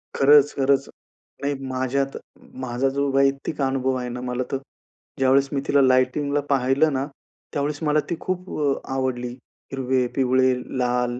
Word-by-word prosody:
खरंच, 145 Hz, +1 st, +6 dB
खरंच. 135 Hz, 0 st, +2 dB, 0.5 s
नाही 145 Hz, +1 st, 0 dB
माझ्यात 130 Hz, +1 st, -1 dB, 0.5 s
माझा 130 Hz, +2 st, 0 dB
जो 140 Hz, +1 st, -1 dB
वैयक्तिक 135 Hz, +2 st, +1 dB
अनुभव 130 Hz, -1 st, 0 dB
आहे 125 Hz, 0 st, -4 dB
ना, 125 Hz, +1 st, -5 dB
मला 125 Hz, 0 st, -2 dB
तर 135 Hz, -, 0 dB, 0.6 s
ज्यावेळेस 135 Hz, +1 st, +3 dB
मी 135 Hz, -, 0 dB
तिला 140 Hz, -, +4 dB
लाइटिंगला 130 Hz, +3 st, +2 dB
पाहिलं 140 Hz, +3 st, +2 dB
ना, 135 Hz, +1 st, -1 dB, 0.5 s
त्यावेळेस 145 Hz, +1 st, -1 dB
मला 150 Hz, 0 st, +3 dB
ती -, -, 0 dB
खूप 185 Hz, 0 st, -4 dB
अ, 140 Hz, -2 st, +3 dB, 0.2 s
आवडली. 125 Hz, -2 st, -2 dB, 0.4 s
हिरवे, 130 Hz, -1 st, 0 dB
पिवळे, 130 Hz, -1 st, +3 dB, 0.2 s
लाल 125 Hz, 0 st, 0 dB
135 Hz, 145 wpm, -23 LUFS, 130-140 Hz, 0.6 s, खरंच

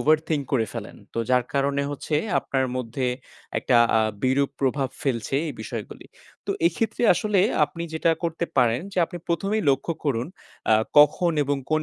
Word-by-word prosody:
overthink 155 Hz, -1 st, +2 dB
করে 115 Hz, -5 st, +2 dB
ফেলেন। -, -, -7 dB, 0.2 s
তো -, -, -2 dB
যার 125 Hz, -1 st, +3 dB
কারণে 140 Hz, 0 st, +1 dB
হচ্ছে 145 Hz, +2 st, -4 dB, 0.2 s
আপনার 135 Hz, -1 st, -1 dB
মধ্যে 125 Hz, +1 st, -2 dB, 0.5 s
একটা 125 Hz, -, +2 dB, 0.2 s
আ -, -, +4 dB, 0.2 s
বিরূপ 135 Hz, +2 st, +2 dB
প্রভাব 135 Hz, 0 st, +1 dB
ফেলছে 120 Hz, -3 st, -1 dB
এই -, -, -4 dB
বিষয়গুলি। -, -, -7 dB, 0.4 s
তো -, -, -1 dB, 0.2 s
এক্ষেত্রে 225 Hz, -6 st, -1 dB
আসলে 210 Hz, 0 st, +1 dB, 0.2 s
আপনি 160 Hz, +3 st, -7 dB
যেটা 165 Hz, +1 st, +2 dB
করতে 170 Hz, 0 st, -1 dB
পারেন 120 Hz, -1 st, +3 dB
যে, 185 Hz, -, -2 dB
আপনি 175 Hz, +1 st, -8 dB
১ম 170 Hz, +4 st, -1 dB
এই 215 Hz, -, -1 dB
লক্ষ্য 135 Hz, +5 st, 0 dB
করুন 125 Hz, -4 st, 0 dB, 0.4 s
আ 110 Hz, -, +7 dB, 0.2 s
কখন 160 Hz, +4 st, +5 dB
এবং 140 Hz, 0 st, 0 dB
কোন 155 Hz, 0 st, +2 dB
140 Hz, 170 wpm, -24 LUFS, 130-165 Hz, 0.5 s, আ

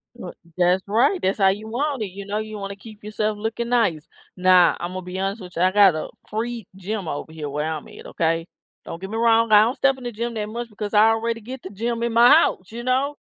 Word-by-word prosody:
Well, 185 Hz, -7 st, -8 dB, 0.2 s
that's 180 Hz, +1 st, +3 dB
right, 245 Hz, -, +2 dB
that's 195 Hz, +3 st, 0 dB
how 195 Hz, -, +5 dB
you 205 Hz, +3 st, -3 dB
want 265 Hz, +2 st, -2 dB
it, 205 Hz, -, -3 dB
you 195 Hz, +2 st, -9 dB
know, 205 Hz, +1 st, -3 dB
you 215 Hz, 0 st, -5 dB
wanna 200 Hz, 0 st, -5 dB
keep 210 Hz, +1 st, -14 dB
yourself 215 Hz, 0 st, -2 dB
looking 225 Hz, +2 st, -3 dB
nice. 200 Hz, -11 st, +1 dB, 0.3 s
Now, 180 Hz, -1 st, +5 dB
Imma 185 Hz, +2 st, -4 dB
be 180 Hz, +1 st, -7 dB
honest 195 Hz, +2 st, -2 dB
with 180 Hz, -1 st, -11 dB
you, 170 Hz, -, +1 dB
I 185 Hz, -, +4 dB
got 200 Hz, -4 st, +6 dB
a 155 Hz, -, -4 dB, 0.2 s
free 230 Hz, -1 st, -4 dB
gym 195 Hz, 0 st, -5 dB
over 155 Hz, +1 st, -5 dB
here 155 Hz, -2 st, -6 dB
where 150 Hz, +2 st, -2 dB
I'm 160 Hz, 0 st, -4 dB
at, -, -, -13 dB
okay? 165 Hz, 0 st, -1 dB, 0.4 s
Don't 165 Hz, -, -8 dB
get 190 Hz, -, -6 dB
me 220 Hz, -, -4 dB
wrong, 230 Hz, -1 st, +3 dB
I 210 Hz, -1 st, +8 dB
don't 240 Hz, +4 st, 0 dB
step 270 Hz, -1 st, +2 dB
in 260 Hz, -, -12 dB
the 240 Hz, -, -4 dB
gym 235 Hz, +1 st, -4 dB
that 210 Hz, -1 st, -3 dB
much, 235 Hz, +2 st, -6 dB
because 210 Hz, 0 st, -6 dB
I 210 Hz, +1 st, +6 dB
already 230 Hz, 0 st, -1 dB
get 255 Hz, +3 st, -9 dB
the 190 Hz, -, -8 dB
gym 230 Hz, +3 st, -3 dB
in 235 Hz, -1 st, -1 dB
my 235 Hz, +1 st, +7 dB
house, 215 Hz, -, +3 dB
you 235 Hz, +1 st, -7 dB
know, 265 Hz, +3 st, 0 dB
210 Hz, 255 wpm, -22 LUFS, 185-235 Hz, 0.4 s, I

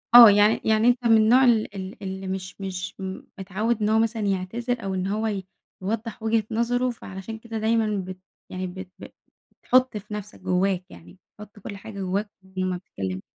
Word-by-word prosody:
آه، 240 Hz, -2 st, +13 dB
يعني 205 Hz, +2 st, +4 dB
يعني 220 Hz, +1 st, +3 dB
أنت 245 Hz, 0 st, +3 dB
من 225 Hz, -1 st, +7 dB
النوع 235 Hz, +5 st, +6 dB
ال 225 Hz, -5 st, +3 dB
ال 190 Hz, +1 st, -7 dB
اللي 190 Hz, 0 st, -5 dB
مش 190 Hz, +1 st, -5 dB
مش 190 Hz, -1 st, -4 dB
م 190 Hz, 0 st, -5 dB, 0.2 s
متعوِّد 210 Hz, +4 st, -1 dB
إن 210 Hz, -, +2 dB
هو 220 Hz, 0 st, +4 dB
مثلًا 225 Hz, 0 st, 0 dB
يعتذر 225 Hz, +5 st, -1 dB
أو 195 Hz, -1 st, -2 dB
إن 185 Hz, 0 st, -1 dB
هو 215 Hz, +3 st, 0 dB
ي 195 Hz, -3 st, -3 dB, 0.4 s
يوضّح 220 Hz, +3 st, -3 dB
وجهة 225 Hz, 0 st, +2 dB
نظَره، 245 Hz, +3 st, +1 dB
فعلشان 220 Hz, -1 st, -7 dB
كده 225 Hz, 0 st, -6 dB
دايمًا 220 Hz, -1 st, +1 dB
بت 185 Hz, 0 st, -7 dB, 0.3 s
يعني 185 Hz, 0 st, -4 dB
بت 185 Hz, 0 st, -8 dB
ب -, -, -8 dB, 0.6 s
بتحُط 255 Hz, -2 st, +3 dB
في 210 Hz, +1 st, -9 dB
نفْسك، 210 Hz, 0 st, -7 dB
جوّاك 185 Hz, 0 st, +1 dB
يعني، 85 Hz, 0 st, -15 dB, 0.2 s
تحُط 210 Hz, 0 st, -12 dB
كلّ 200 Hz, 0 st, -7 dB
حاجة 200 Hz, 0 st, -9 dB
جوّاك 195 Hz, +3 st, -1 dB, 0.3 s
وما 185 Hz, -1 st, 0 dB
بتتكلّمش. 95 Hz, -, -5 dB
210 Hz, 190 wpm, -25 LUFS, 190-225 Hz, 0.6 s, آه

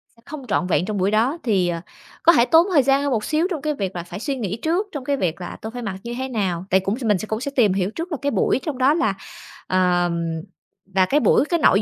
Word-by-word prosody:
sẽ 230 Hz, -, -24 dB
không 285 Hz, -4 st, -8 dB
trọn 200 Hz, -4 st, 0 dB
vẹn 175 Hz, -1 st, +1 dB
trong 210 Hz, 0 st, -3 dB
buổi 190 Hz, +1 st, +1 dB
đó. 235 Hz, +9 st, +2 dB
Thì, 195 Hz, -7 st, +2 dB
ờ, 170 Hz, -1 st, -3 dB, 0.4 s
có 335 Hz, -, +7 dB
thể 235 Hz, -, +5 dB
tốn 330 Hz, +6 st, +5 dB
thời 285 Hz, -5 st, +5 dB
gian 270 Hz, +1 st, +3 dB
hơn 285 Hz, -, 0 dB
một 220 Hz, -4 st, 0 dB
xíu 315 Hz, +3 st, +1 dB
trong 315 Hz, -5 st, -3 dB
cái 305 Hz, +1 st, -1 dB
việc 195 Hz, -8 st, -4 dB
là 175 Hz, -, -4 dB
phải 175 Hz, -, -8 dB
suy 275 Hz, +4 st, -2 dB
nghĩ 215 Hz, -5 st, -3 dB
trước, 350 Hz, +6 st, 0 dB
trong 285 Hz, -4 st, -5 dB
cái 280 Hz, 0 st, 0 dB
việc 175 Hz, -5 st, -2 dB
là 175 Hz, -, -6 dB
tôi 220 Hz, -, -6 dB
phải 245 Hz, +1 st, -6 dB
mặc 205 Hz, -5 st, -4 dB
như 235 Hz, -, -5 dB
thế 260 Hz, +1 st, -3 dB
nào. 190 Hz, -7 st, -2 dB
Tại 190 Hz, -, +4 dB
cũng 195 Hz, +5 st, -2 dB
s -, -, -6 dB
mình 210 Hz, -4 st, +3 dB
cũng 220 Hz, +1 st, -3 dB
sẽ 280 Hz, -, -3 dB
tìm 215 Hz, -7 st, +4 dB
hiểu 190 Hz, -1 st, 0 dB
trước 335 Hz, +8 st, -6 dB
là 310 Hz, -, -1 dB
cái 285 Hz, 0 st, 0 dB
buổi -, -, +1 dB
trong 300 Hz, -5 st, -4 dB
đó 265 Hz, +3 st, +4 dB
là, 220 Hz, -11 st, +1 dB, 0.5 s
ờ 180 Hz, -1 st, +2 dB, 0.9 s
và 190 Hz, -1 st, +5 dB
cái 280 Hz, +10 st, +2 dB
buổi, 285 Hz, -, +3 dB
cái 340 Hz, +2 st, 0 dB
nội 200 Hz, -9 st, +4 dB
230 Hz, 285 wpm, -22 LUFS, 190-285 Hz, 0.9 s, có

